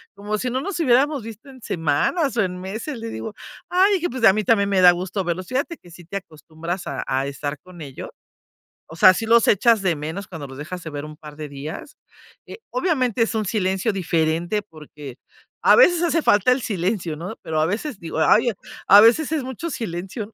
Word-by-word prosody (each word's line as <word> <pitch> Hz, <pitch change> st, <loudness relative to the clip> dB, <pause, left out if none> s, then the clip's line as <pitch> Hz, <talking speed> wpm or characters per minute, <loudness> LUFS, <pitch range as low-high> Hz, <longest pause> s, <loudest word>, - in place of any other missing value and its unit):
como 205 Hz, +1 st, -3 dB
si 250 Hz, -, -2 dB
no 260 Hz, +2 st, -2 dB
nos 380 Hz, +1 st, -4 dB
hubiéramos 275 Hz, -2 st, +2 dB
visto 225 Hz, +4 st, -10 dB
en 260 Hz, -2 st, -14 dB
semanas 180 Hz, -, 0 dB
o -, -, +4 dB
en 180 Hz, -1 st, -4 dB
meses, 220 Hz, +9 st, -6 dB
le 230 Hz, 0 st, -6 dB
digo: 220 Hz, -1 st, -6 dB, 0.4 s
"Ay, 380 Hz, +3 st, +4 dB
dije, 350 Hz, -1 st, -1 dB
pues 250 Hz, -1 st, -6 dB
a 190 Hz, -, +7 dB
mí 215 Hz, -, -1 dB
también 200 Hz, -1 st, +2 dB
me 195 Hz, -2 st, +2 dB
da 180 Hz, -1 st, +9 dB
gusto 185 Hz, +2 st, -3 dB
verlos". 175 Hz, +1 st, -3 dB
Fíjate 280 Hz, +6 st, -2 dB
que 175 Hz, -, -18 dB
sí 175 Hz, 0 st, -14 dB
te 200 Hz, +4 st, -5 dB
acostumbras 165 Hz, 0 st, -7 dB
a -, -, -4 dB
a 135 Hz, +1 st, 0 dB
estar 145 Hz, +1 st, -5 dB
con 180 Hz, 0 st, -14 dB
ellos, 140 Hz, -3 st, -8 dB, 0.8 s
o 160 Hz, -, -11 dB
sea, 185 Hz, +2 st, +7 dB
si 225 Hz, -, -3 dB
los 230 Hz, 0 st, +5 dB
echas 220 Hz, +1 st, +4 dB
de 180 Hz, -3 st, +1 dB
menos 160 Hz, +7 st, -6 dB
cuando 160 Hz, -6 st, -7 dB
los 135 Hz, +1 st, -11 dB
dejas 175 Hz, +4 st, -7 dB
de 160 Hz, -, -7 dB
ver 145 Hz, -1 st, -6 dB
un 150 Hz, 0 st, -10 dB
par 150 Hz, -1 st, -12 dB
de 155 Hz, -1 st, -7 dB
días. 145 Hz, -, -8 dB, 0.5 s
Eh, -, -, -10 dB
obviamente 260 Hz, -, 0 dB
es 225 Hz, -, 0 dB
un 215 Hz, -, 0 dB
silencio 195 Hz, +1 st, 0 dB
diferente, 170 Hz, +2 st, 0 dB
porque 150 Hz, -6 st, -12 dB, 0.5 s
a -, -, +6 dB
veces 355 Hz, -8 st, +5 dB
hace 330 Hz, -2 st, +1 dB
falta 205 Hz, +5 st, +4 dB
el 255 Hz, -, +1 dB
silencio, 180 Hz, -4 st, -2 dB
¿no?, 175 Hz, +8 st, -6 dB
pero 155 Hz, -1 st, -2 dB
a 155 Hz, -, +2 dB
veces 215 Hz, -, -3 dB
digo: 165 Hz, -1 st, -6 dB
"Ay, 230 Hz, +9 st, +4 dB
a -, -, -7 dB, 0.3 s
a 200 Hz, -, +10 dB
veces 245 Hz, +9 st, +4 dB
es 310 Hz, -, 0 dB
mucho 260 Hz, +6 st, -5 dB
silencio, 205 Hz, +1 st, -5 dB
195 Hz, 220 wpm, -22 LUFS, 165-240 Hz, 0.8 s, a